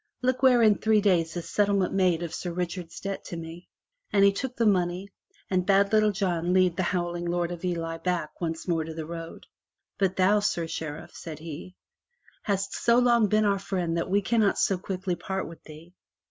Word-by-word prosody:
Look 255 0 +1
where 250 -3 +5
in 215 -2 +4
three 220 -1 +3
days 180 -5 +1
is 170 - -5
settlement 200 -3 +1
made 180 -3 +2
of 170 - -5
Sir 175 - -4
Richard's 175 -1 -4
debt 195 -1 -5
to 170 - -6
me!" 165 +2 -9 0.4
And 200 -2 +5
he 200 - +6
took 250 +5 -4
the 230 - +1
money 185 -1 +1 0.4
and 185 -1 +1
bade 200 +2 +3
Little 215 -1 +4
John 180 -3 -1
lead 185 -2 +3
the - - -1
howling 175 -2 -2
Lord 175 0 -1
of 175 0 -7
Ely 165 -2 -2
back 180 -3 -3
once 165 0 -3
more 165 -2 +1
to 160 0 -7
the 160 -1 -5
road. 165 0 -8 0.5
"But 190 -2 +1
thou, 195 +3 +4
Sir 190 -5 0
Sheriff," 160 -1 -6
says 160 -3 -7
he, 165 +3 -9 0.7
"hast 195 -1 -2
so 235 0 +3
long 240 -3 +4
been 215 +1 +2
our 200 -1 +2
friend 180 -4 -2
that 170 - -2
we 200 +2 +2
cannot 220 -1 +2
so 190 -2 +1
quickly 185 -1 -3
part 190 +2 -4
with 165 -1 -11
thee. 160 +3 -13
185 Hz, 200 wpm, -27 LUFS, 170-200 Hz, 0.7 s, he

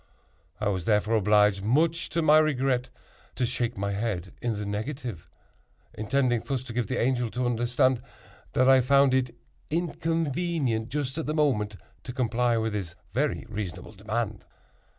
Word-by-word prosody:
I 105 - 0
was 95 -4 -2
therefore 110 +1 +2
obliged, 105 -1 +4
much 155 +9 +2
to 165 - 0
my 155 0 +7
regret, 135 -4 +1 0.5
to 125 - +1
shake 120 -1 -2
my 100 +1 -1
head 100 -4 -3
in 120 -1 0
the 105 0 -4
negative—intending 115 - -4
thus 135 -3 -2
to 125 -3 -8
give 120 0 -1
the 130 - -2
Angel 125 -1 +1
to 125 +2 -2
understand 120 +1 +2 0.5
that 130 - +3
I 130 -1 +7
found 140 +1 +4
it 125 -2 +1 0.3
inconvenient, 165 -6 -1
just 145 0 -2
at 160 - -3
that 155 - -1
moment, 110 -9 +1 0.3
to 125 - -7
comply 120 -2 +1
with 110 -1 -1
his 90 -5 -4 0.2
very 140 -1 0
reasonable 105 -6 -5
demand! 110 +1 -3
120 Hz, 150 wpm, -27 LUFS, 105-135 Hz, 0.5 s, my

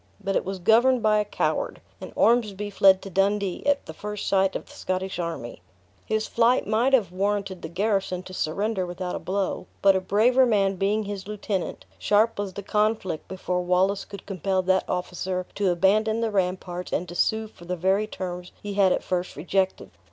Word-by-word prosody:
But 195 -1 -2
it - - +2
was 195 +1 -4
governed 235 +6 +4
by 215 -1 +4
a - - +2
coward, - - -1 0.2
and - - -7
Ormsby 210 -3 +2
fled 190 -1 +5
to 195 - -8
Dundee 195 0 0
at 285 -1 +2
the - - -8
first 210 -1 -5
sight 195 -1 +2
of - - -4
the - - -17
Scottish 185 0 -3
army. 165 - -5 0.5
His 220 0 0
flight 235 +2 +3
might 230 +5 +1
have 215 -10 +3
warranted 195 0 -1
the - - -5
garrison 195 0 -1
to 185 - -10
surrender 195 +5 -1
without 180 0 -4
a - - -3
blow, 195 +1 -2 0.2
but 195 -1 +6
a 190 - +1
braver 225 +7 +4
man 195 -4 +2
being 205 +3 +1
his 200 -1 -6
lieutenant, 205 -3 -3
sharp 215 +1 +2
was 200 -2 -3
the 200 - -6
conflict 210 -5 0
before 180 -1 -2
Wallace 185 +3 +1
could 200 -2 -10
compel 190 0 -1
that 185 0 +1
officer 180 0 -2
to 200 -2 +1
abandon 210 +5 +2
the 225 -1 0
ramparts 180 -2 -2
and 180 - -1
to 175 - -8
sue 220 +5 +1
for 175 -5 -16
the 180 +1 -2
very 190 +4 +1
terms 180 -3 -6
he 205 -1 -4
had 195 -2 +4
at - - 0
first 180 0 -2
rejected. 190 +5 -1
195 Hz, 195 wpm, -25 LUFS, 185-210 Hz, 0.5 s, but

